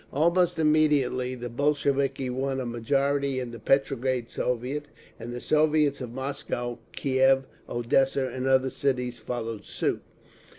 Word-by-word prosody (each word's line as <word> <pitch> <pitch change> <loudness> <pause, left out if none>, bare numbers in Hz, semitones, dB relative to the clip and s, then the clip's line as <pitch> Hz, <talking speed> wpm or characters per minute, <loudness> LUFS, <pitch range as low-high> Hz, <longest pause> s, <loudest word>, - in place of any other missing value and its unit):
Almost 170 +4 +2
immediately 150 -5 +2
the 120 0 -5
Bolsheviki 140 +1 0
won 135 +1 -1
a 130 - -3
majority 135 +3 0
in 125 -2 -5
the 115 - -8
Petrograd 130 -1 +1
Soviet, 125 +4 -2 0.3
and 120 - -6
the 120 - -5
Soviets 150 -1 +2
of 125 -2 -5
Moscow, 130 -2 -4
Kiev, 135 0 +3 0.3
Odessa 130 +3 +1
and 130 0 -3
other 130 0 +3
cities 125 -2 -1
followed 115 -1 -4
suit. - - -2
130 Hz, 130 wpm, -27 LUFS, 125-140 Hz, 0.3 s, Kiev